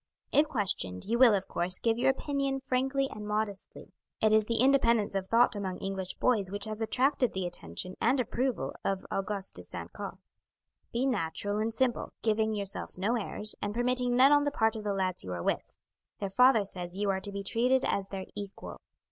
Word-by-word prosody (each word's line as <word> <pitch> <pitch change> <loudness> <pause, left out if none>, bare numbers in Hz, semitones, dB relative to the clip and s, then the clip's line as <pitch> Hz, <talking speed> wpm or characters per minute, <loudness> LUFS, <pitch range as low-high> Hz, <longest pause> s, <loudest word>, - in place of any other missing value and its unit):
If 295 +2 +4
questioned, 175 - -2
you 235 +3 0
will, 240 -5 +7
of 195 -1 -2
course, 180 +1 +3
give 230 0 0
your 265 +2 +4
opinion 275 0 -1
frankly 270 +1 0
and 210 -1 -7
modestly; 210 -2 -4 0.3
it 215 - +3
is 215 -1 +4
the 230 - -1
independence 235 -5 +3
of 195 -1 -2
thought 230 +1 +4
among 190 -3 -3
English 190 -1 -4
boys 210 -7 +1
which 205 +2 -3
has 215 0 -5
attracted 250 +3 +2
the 190 -1 -2
attention 175 - -5
and 255 +4 +3
approval 240 - -1
of 195 -1 -1
Auguste 195 0 -2
de - - -7
St. - - -7
Caux. - - -6 0.7
"Be 240 +3 0
natural 205 -3 -1
and 220 +1 0
simple, 240 +1 -1
giving 220 0 +1
yourself 200 -3 -4
no 205 +6 +1
airs, 215 -1 -2
and 205 +1 -3
permitting 250 0 +1
none 265 +3 +7
on 290 0 +5
the 290 - +1
part 225 -5 +1
of 215 - -5
the 205 -1 -1
lads 185 -2 -1
you 90 - -5
are 85 -1 -4
with; - - -2 0.4
their 200 -2 -3
father 250 -1 +5
says 180 -1 -6
you 200 -1 +1
are 190 0 -2
to 200 - -6
be 200 0 -5
treated 250 +5 +2
as 195 -1 -1
their 190 -1 -5
equal. 200 -1 -8
215 Hz, 200 wpm, -30 LUFS, 195-250 Hz, 0.7 s, will